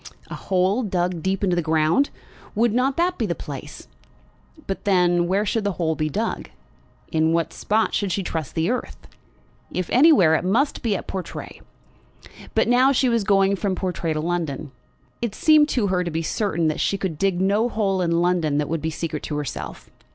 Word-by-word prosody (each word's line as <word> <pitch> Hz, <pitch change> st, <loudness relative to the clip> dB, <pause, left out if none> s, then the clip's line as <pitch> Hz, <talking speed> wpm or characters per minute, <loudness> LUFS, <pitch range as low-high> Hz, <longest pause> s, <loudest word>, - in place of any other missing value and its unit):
A -, -, -4 dB
hole 190 Hz, +5 st, +1 dB
dug 180 Hz, -5 st, -1 dB
deep 190 Hz, +3 st, -1 dB
into 180 Hz, -3 st, +2 dB
the 175 Hz, -, +1 dB
ground; 160 Hz, -, +2 dB, 0.5 s
would 225 Hz, +1 st, +2 dB
not 260 Hz, +3 st, +1 dB
that 355 Hz, +2 st, +1 dB
be 225 Hz, -, 0 dB
the 170 Hz, -, -1 dB
place? 145 Hz, 0 st, -8 dB, 0.8 s
But 195 Hz, -, -4 dB
then, 175 Hz, -3 st, +3 dB
where 195 Hz, +4 st, +1 dB
should 220 Hz, +1 st, 0 dB
the 200 Hz, -1 st, -1 dB
hole 165 Hz, -2 st, 0 dB
be 155 Hz, -1 st, -2 dB
dug? 140 Hz, -, -3 dB, 0.6 s
In 160 Hz, 0 st, +2 dB
what 165 Hz, -1 st, 0 dB
spot 220 Hz, +2 st, 0 dB
should 200 Hz, -3 st, 0 dB
she 195 Hz, -, -1 dB
trust 160 Hz, -4 st, -4 dB
the 165 Hz, +6 st, +1 dB
earth? 250 Hz, -, -4 dB, 0.7 s
If 180 Hz, -2 st, -3 dB
anywhere, 255 Hz, -, +6 dB
it 160 Hz, -, +1 dB
must 235 Hz, +11 st, +1 dB
be 220 Hz, -4 st, 0 dB
at -, -, -5 dB
Portray. 190 Hz, -2 st, -7 dB, 0.9 s
But -, -, +3 dB
now 250 Hz, +3 st, +5 dB
she 260 Hz, -1 st, +2 dB
was 230 Hz, -2 st, +1 dB
going 195 Hz, -1 st, +3 dB
from 195 Hz, -1 st, -1 dB
Portray 175 Hz, -4 st, -2 dB
to 155 Hz, -, -2 dB
London. 160 Hz, -4 st, -3 dB, 0.5 s
It 235 Hz, -4 st, -2 dB
seemed 305 Hz, -1 st, +5 dB
to 240 Hz, -7 st, +1 dB
her 180 Hz, -1 st, +1 dB
to 175 Hz, -, -3 dB
be 165 Hz, 0 st, -2 dB
certain 170 Hz, -3 st, 0 dB
that 155 Hz, -, -1 dB
she 200 Hz, -, +1 dB
could 180 Hz, -6 st, -4 dB
dig 195 Hz, -2 st, +1 dB
no 205 Hz, +5 st, +2 dB
hole 195 Hz, -5 st, 0 dB
in 170 Hz, -1 st, +1 dB
London 170 Hz, -5 st, +1 dB
that 150 Hz, -1 st, -1 dB
would 165 Hz, -1 st, -2 dB
be 160 Hz, -, -1 dB
secret 155 Hz, -1 st, -4 dB
to 150 Hz, -, -4 dB
herself. 145 Hz, -1 st, -6 dB
185 Hz, 195 wpm, -23 LUFS, 165-210 Hz, 0.9 s, anywhere